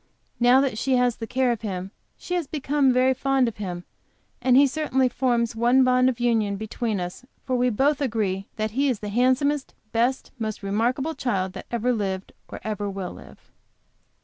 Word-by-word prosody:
Now 245 +2 +6
that 260 -6 -1
she 265 +1 +1
has 245 -2 +2
the 225 - -6
care 255 0 +1
of 230 - -3
him, 190 -3 -4 0.3
she 360 - -6
has 350 -5 -1
become 285 -2 +1
very 255 +1 +3
fond 270 -1 +1
of 230 - -5
him, 180 -4 -5 0.6
and 250 0 +4
he 280 - +7
certainly 265 -2 +1
forms 240 -2 0
one 240 +3 +4
bond 255 0 +4
of 245 -2 -4
union 225 -4 +1
between 220 0 -3
us, 180 +6 -6 0.2
for 255 - 0
we 250 0 +2
both 275 +5 +1
agree 210 -7 -1
that 215 0 -2
he 275 +5 +1
is 250 - 0
the 210 - -4
handsomest, 260 +5 +1 0.2
best, 240 +3 0
most 215 -2 -4
remarkable 240 +10 0
child 190 -10 -2
that 190 - -9
ever 240 +1 0
lived, 195 -4 -3 0.2
or - - -7
ever 205 -1 -3
will 195 -2 -5
live. 70 -1 -15
240 Hz, 190 wpm, -24 LUFS, 210-260 Hz, 0.6 s, he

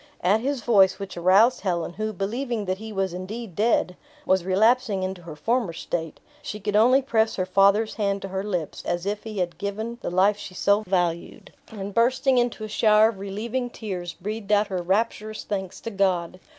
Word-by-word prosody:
At 195 +5 +3
his 275 0 -2
voice, 195 -5 +4
which 195 -1 -7
aroused 195 +8 +4
Helen, 175 -3 -2
who, 215 +2 -3
believing 220 +3 -3
that 185 0 -2
he 220 0 -7
was 195 -3 -1
indeed 195 +3 -6
dead, 210 -3 +1 0.3
was 190 -1 +2
relapsing 205 +1 +2
into 185 -1 -4
her 165 -3 -9
former 225 +2 0
state; 165 0 -4 0.2
she 210 -7 -6
could 210 0 -2
only 250 +5 +5
press 225 -3 +1
her 185 - -1
father's 200 +3 +3
hand 200 -2 -1
to 195 - -5
her 190 +1 -3
lips, 180 -7 -4
as 175 +1 -2
if 205 +1 -2
he 215 -2 -6
had 180 -2 -2
given 220 +4 -4
the - - -3
life 190 +4 +3
she 185 - -9
so 200 +3 +3
valued, 175 -2 -2
and 200 -2 -7
bursting 255 +3 +3
into 240 -2 -1
a - - -4
shower 215 0 +4
of 210 -4 -7
relieving 225 +6 -3
tears, 185 -7 -6
breathed 210 +2 -5
out 210 0 +3
her 185 -2 -2
rapturous 215 +3 -1
thanks 190 -2 -4
to 230 - -5
God. 185 -3 0
200 Hz, 195 wpm, -24 LUFS, 185-220 Hz, 0.3 s, only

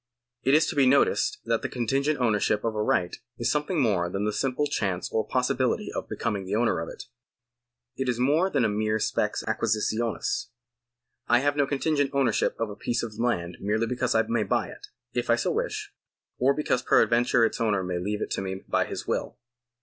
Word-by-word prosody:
It 135 +2 +3
is 155 - +5
to - - -3
be 135 -2 +4
noticed 140 +2 +3
that 115 -1 +1
the - - -3
contingent 135 +5 0
ownership 105 -3 +1
of 115 - -1
a 105 - -1
right 90 -4 +1 0.2
is 120 - 0
something 150 +3 0
more 100 -9 +2
than 100 +3 -2
a 105 - +1
simple 135 +5 0
chance 95 -9 -1
or 110 -1 0
possibility 125 -1 0
of - - -5
becoming 100 -2 -2
the 95 +2 -2
owner 115 -5 +2
of 80 - -4
it. - - -9 0.9
It 130 -1 -2
is 120 - 0
more 150 +9 +3
than 135 -9 +1
a - - +4
mere 110 +1 0
spes 110 - -1
acquisitionis. 115 - -1 0.8
I 120 - +5
have 145 +1 +1
no 145 -1 +2
contingent 145 0 +1
ownership 130 -5 +1
of 115 -2 -2
a - - -7
piece 120 +2 -2
of 110 -2 -6
land 90 -8 -1
merely 110 +3 0
because 125 +2 -1
I - - +4
may - - 0
buy - - 0
it, 410 - -11 0.3
if - - -2
I - - +6
so - - -1
wish; 430 -3 -3 0.5
or 135 +2 +3
because 150 -4 0
peradventure 120 0 +3
its 115 - -2
owner 105 -4 +1
may 90 -1 -2
leave 105 +4 -2
it - - -6
to - - -1
me 95 0 -3
by 95 - -1
his - - -6
will. - - -2
120 Hz, 205 wpm, -26 LUFS, 105-140 Hz, 0.9 s, I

